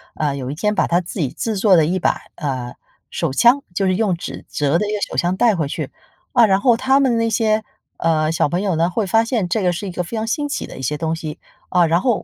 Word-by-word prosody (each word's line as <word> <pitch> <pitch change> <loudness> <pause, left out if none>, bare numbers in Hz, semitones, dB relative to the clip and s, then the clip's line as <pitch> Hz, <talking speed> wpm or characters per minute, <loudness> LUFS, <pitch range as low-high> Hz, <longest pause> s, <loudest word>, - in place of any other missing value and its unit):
呃， 145 -2 -1
有 130 0 -4
一 - - -5
天 210 +4 0
把 - - +2
他 175 +2 +2
自 175 +2 -8
己 140 -6 0
制 220 -3 -3
作 195 -1 +5
的 160 -3 +5
一 180 +4 0
把， - - +1 0.2
呃， 130 -5 -4 0.4
手 - - -1
枪 245 - +4
就 195 +1 +1
是 185 - +2
用 200 -4 +1
纸 - - -7
折 150 +2 +1
的 210 - 0
一 - - -2
个 - - 0
手 - - -7
枪 175 +2 +1
带 230 -4 +4
回 155 -4 -1
去。 - - -4 0.4
啊， 240 -3 +6
然 190 0 +3
后 240 -3 +4
他 265 +2 +3
们 255 -4 +2
那 230 0 +1
些， 220 -1 +1 0.3
呃， 155 -1 +1
小 165 - +1
朋 175 +4 -1
友 190 -4 0
呢， 165 +2 +2
会 205 +3 -1
发 225 +4 +3
现 225 -6 -1
这 200 +2 0
个 180 - +3
是 195 +4 -5
一 - - -4
个 180 0 -3
非 225 +6 -6
常 220 - -1
新 290 +4 -1
奇 - - -3
的 - - -10
一 - - -7
些 150 +4 -2
东 160 0 -1
西， 155 -2 -7 0.3
啊， 180 -2 +4
然 170 +3 +2
后， 240 -3 +1
185 Hz, 300 characters per minute, -20 LUFS, 160-225 Hz, 0.4 s, 啊